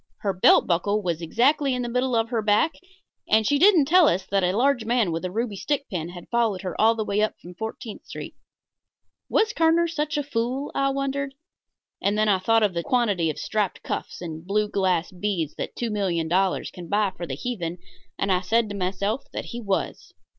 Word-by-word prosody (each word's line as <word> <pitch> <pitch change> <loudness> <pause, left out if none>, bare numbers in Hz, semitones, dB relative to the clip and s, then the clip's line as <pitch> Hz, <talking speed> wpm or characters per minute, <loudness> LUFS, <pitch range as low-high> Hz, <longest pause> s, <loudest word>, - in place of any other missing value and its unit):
Her 200 -2 0
belt 185 - +5
buckle 200 +4 0
was 170 -2 -2
exactly 265 - +2
in 250 - -2
the - - -3
middle 250 +1 0
of 225 0 +1
her 235 -3 0
back, 215 +10 +2 0.6
and 220 0 +4
she 285 +6 +2
didn't 360 -4 +6
tell 345 +2 +6
us 185 -4 +1
that 195 -1 +2
a 180 +3 +1
large 265 -1 +2
man 230 -5 +1
with 165 +2 -3
a 185 - -2
ruby 220 +2 -2
stick 285 +7 -2
pin 170 -3 -3
had 175 -1 -10
followed 230 -6 +1
her 185 - -3
up - - -10
all 225 +2 +5
the 220 -1 -2
way 210 +1 +1 0.2
from 175 - -11
Fourteenth 220 +4 -7
Street. - - -7 1.0
Was 435 0 +2
Kerner 330 +1 +3
such 305 -1 -2
a 290 - 0
fool? 260 +1 -2
I 275 0 +1
wondered. 275 0 -2 0.7
And 205 +1 +1
then 215 0 +2
I 195 -2 +3
thought 225 +4 +3
of 205 -3 +2
the 170 - -1
quantity 205 -7 +1
of 155 - -4
striped 210 -4 -2
cuffs - - -5
and 160 -2 -6
blue 210 +3 0
glass 185 -4 0
beads 180 -5 -2
that - - -4
$2,000,000 190 -4 0
can 175 -2 -9
buy 205 0 +1
for 175 - -6
the 135 - -4
heathen, 175 - -4 0.4
and 195 - 0
I 180 -1 +2
said 225 +3 +1
to 205 - -5
myself 200 +6 -2
that - - -4
he 240 - -5
was. 200 -3 -3
210 Hz, 210 wpm, -24 LUFS, 185-250 Hz, 1.0 s, didn't